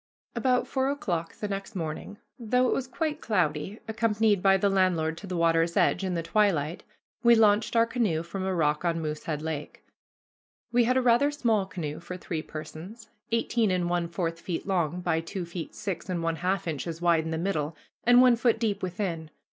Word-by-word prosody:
About 250 +1 +1
four 265 0 0
o'clock 180 -13 -2
the 210 - -4
next 195 +1 -5
morning, 165 +4 -5 0.2
though 250 +2 +2
it - - +2
was 265 - -2
quite 305 +3 -3
cloudy, 180 -1 -1
accompanied 220 -2 +2
by 195 0 +5
the 200 - +2
landlord 180 -5 +2
to 200 - -9
the 180 -1 -3
water's 165 0 +2
edge, - - +3
in 185 -2 -1
the 165 - -2
twilight, 170 -5 +1 0.4
we 235 -1 +6
launched 215 0 +3
our 230 0 +5
canoe 220 -10 0
from 185 +3 -5
a 190 -1 -1
rock 150 -2 +1
on 170 -1 0
Moosehead 155 -1 -4
Lake. 155 -2 -5 0.9
We 240 -1 +4
had 255 +2 +2
a 260 - +2
rather 245 +4 +4
small 230 -9 +1
canoe 155 -6 -5
for 180 +2 -7
three 165 -3 -4
persons, 165 +9 -9 0.2
eighteen 230 -1 +1
and 180 -2 0
one 175 -1 0
fourth 165 -1 -3
feet 170 -1 -4
long 180 -3 0
by 160 -2 +1
two 175 +2 -5
feet 170 -1 -7
six 195 -2 -5
and 175 -2 -2
one 165 0 0
half 185 +1 -1
inches 160 +1 -4
wide 170 -2 +3
in 160 - -4
the 160 - -2
middle, 160 -3 -2 0.3
and 245 +1 +7
one 250 -2 +6
foot 235 -1 +2
deep 220 -3 -1
within. 175 -4 -3
185 Hz, 195 wpm, -27 LUFS, 165-220 Hz, 0.9 s, and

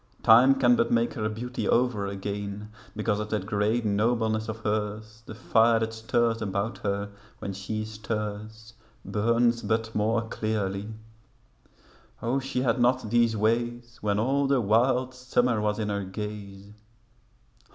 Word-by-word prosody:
Time 120 +4 +7
can 125 -2 +4
but 115 - +1
make 115 0 +2
her 110 -5 -2
beauty 115 -1 -4
over 115 -5 +1
again 100 +1 -5 0.2
Because 105 -1 0
of 105 0 -4
that 105 -3 -2
great 105 +3 0
nobleness 110 +1 +1
of 110 - -4
hers; 110 +1 -3
The 110 - -8
fire 115 0 +3
that 110 0 -2
stirs 115 0 0
about 100 +2 -2
her, 100 0 -2 0.3
when 100 - -5
she 110 +3 -4
stirs 110 0 -5 0.3
Burns 115 +2 +2
but 110 +1 -1
more 110 +2 +1
clearly; 105 -2 -2 1.3
O 120 +4 0
she 135 -1 -2
had 130 0 +1
not 120 -2 +2
these 115 -2 +3
ways 120 +2 -1
When 105 -1 0
all 135 +6 +1
the 135 -1 +3
wild 125 +4 +2
summer 125 -2 0
was 105 0 0
in 105 -2 -2
her 100 -1 -2
gaze. 100 0 -7
110 Hz, 145 wpm, -27 LUFS, 105-120 Hz, 1.3 s, Time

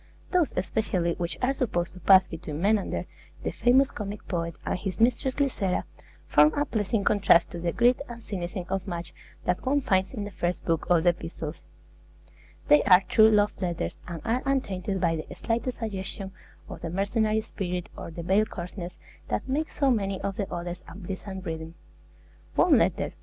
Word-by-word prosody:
Those 355 -5 +3
especially 185 -2 0
which 170 -1 -2
are 260 +2 +3
supposed 190 -10 -1
to 185 - -11
pass 190 +2 +7
between 160 -3 -6
Menander, 205 +2 +1 0.4
the - - -1
famous 260 +3 +4
comic 205 0 -6
poet, 170 -3 -2
and - - 0
his 185 -2 -4
mistress 250 +3 +2
Glycera, 235 -10 0 0.4
form 150 +1 +6
a 290 - +1
pleasing 210 -4 0
contrast 200 -5 +4
to 175 - -6
the 170 0 -1
greed 245 +5 +3
and 235 -1 -7
cynicism 180 -2 -4
of 190 0 -2
much 170 -2 -5 0.3
that 180 - 0
one 275 +2 +2
finds 190 -7 +1
in 220 -6 -4
the 205 - -6
first 175 -1 -2
book 165 -1 0
of 170 -2 +4
the 175 - +6
epistles; 165 -2 -6 1.1
they 295 0 +7
are 180 -1 +8
true 220 0 +7
love 210 -1 +3
letters, 175 -2 -2
and 170 -2 -6
are 235 +2 +1
untainted 200 -8 -1
by 165 -2 +1
the 155 - -7
slightest 235 +2 -2
suggestion 195 -3 -5 0.4
of - - -9
the 165 - -4
mercenary 215 +4 +1
spirit 180 -5 -4
or - - -7
the 170 +1 -7
veiled 200 +5 +2
coarseness 180 0 -7 0.3
that - - -2
makes 295 +4 -2
so 275 -2 +4
many 195 -4 0
of 195 0 -2
the 200 -3 -3
others 175 +1 -4
unpleasant 190 +1 -7
reading. 160 0 -5 0.8
One - - +5
letter - - +2
(i. - - -5
195 Hz, 180 wpm, -27 LUFS, 175-220 Hz, 1.1 s, are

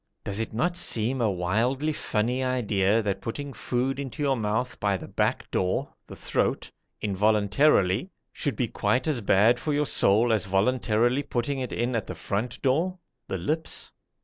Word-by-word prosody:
Does 100 +1 -3
it 115 - -2
not 175 +10 0
seem 125 -6 0
a 110 - +3
wildly 115 - 0
funny 125 +1 -1
idea 110 -4 +1
that 100 -1 -2
putting 140 +4 -5
food 125 +4 -2
into 140 +2 -4
your 135 -2 +2
mouth 110 +2 -2
by 100 -2 +1
the - - -9
back - - -1
door 90 0 -1
(the - - -9
throat) - - -1 0.3
involuntarily 105 - +2 0.2
should 145 -5 -2
be 125 - 0
quite 110 +5 0
as 145 -6 0
bad 110 +4 +4
for 150 +3 -1
your 150 +1 +1
soul 115 -1 +4
as 105 -1 0
voluntarily 120 +5 +2
putting 135 +1 -2
it 130 -2 -4
in 120 +1 -1
at 110 - -2
the - - -5
front 105 +5 -3
door 165 +8 +1 0.3
(the 95 - -3
lips)? 155 - -2
120 Hz, 170 wpm, -26 LUFS, 105-135 Hz, 0.3 s, bad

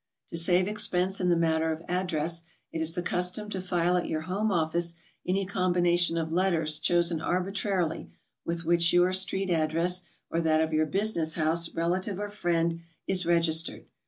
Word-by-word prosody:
To - - -7
save 175 +2 +2
expense 190 -2 0
in 180 - +1
the 175 - +3
matter 160 -1 +1
of 160 +1 -6
address, 170 -2 -2 0.3
it 160 - -4
is 160 +1 -1
the 175 - -3
custom 180 +4 -1
ito 195 - -3
file 180 -1 0
at 175 - -2
your 155 - -3
home 195 +6 -2
office 170 0 0 0.3
any 190 +2 0
combination 175 -2 +1
of 160 -1 -3
letters 165 -4 +2
chosen 170 0 +3
arbitrarily, 185 -2 -2 0.3
with 170 0 -4
which 170 0 +2
your 175 +1 +3
street 190 0 +1
address, 170 +3 0 0.2
or 165 - 0
that 160 -1 +2
of 160 0 -1
your 155 0 +1
business 170 -3 +2
house, 165 +1 +3
relative, 180 +4 -2
or 205 0 -4
friend 170 -4 -1 0.2
is 185 -3 +2
regis 165 -2 +4
tered. - - -9
175 Hz, 175 wpm, -27 LUFS, 165-185 Hz, 0.3 s, regis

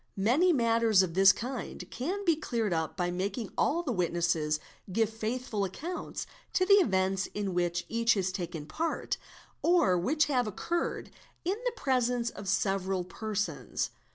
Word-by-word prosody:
Many 260 - +4
matters 230 - +4
of 175 -3 -3
this 195 +2 +7
kind 245 +4 -5
can 370 +11 -3
be 335 -3 +4
cleared 230 - -1
up 160 0 -2
by 175 -1 0
making 195 +4 -3
all 340 +4 +1
the 285 - -2
witnesses 170 -5 +1 0.3
give 225 +3 +1
faithful 220 -1 -2
accounts 315 - -4 0.3
of 370 - +2
the 400 - +7
events 190 - +1
in 200 -2 -2
which 175 -1 0
each 230 -1 +2
has 190 -2 0
4 - - -16
taken 170 -5 -4
part, 325 - -2 0.4
or 265 - +4
which 300 - +2
have 250 -5 +1
occurred 335 - -2 0.3
in 380 +4 0
the - - +1
presence 245 - +1
of 200 - -9
several 195 -1 0
persons. 210 +3 -3
215 Hz, 155 wpm, -30 LUFS, 185-255 Hz, 0.4 s, this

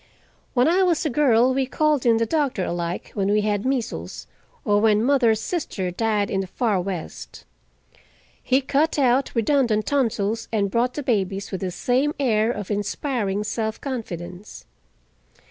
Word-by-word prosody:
When 250 +2 +4
I 355 +4 +3
was 350 -5 +2
a 305 - 0
girl 255 -2 +3
we 265 0 0
called 295 -1 +1
in 230 -1 +5
the 230 - +1
doctor 270 - 0
alike 170 0 -4
when 200 -2 -1
we 210 +1 +3
had 210 +2 -1
measles, 225 - -3 0.4
or 205 0 +3
when 215 -1 +3
mother's 240 -5 +3
sister 220 - -3
died 210 +1 0
in 195 - 0
the 190 - -5
far 205 -1 0
West. 170 - -7 1.0
He 260 +2 +2
cut 285 +4 +1
out 265 -1 +3
redundant 230 -3 +2
tonsils 225 -5 0
and 200 -3 0
brought 245 +3 0
the 295 - -3
babies 200 -5 -1
with 190 - -4
the 190 - -2
same 255 - 0
air 225 -5 +2
of 210 -3 -5
inspiring 205 0 -2
self 220 +1 -3
confidence. 185 - -7
225 Hz, 160 wpm, -23 LUFS, 200-265 Hz, 1.0 s, in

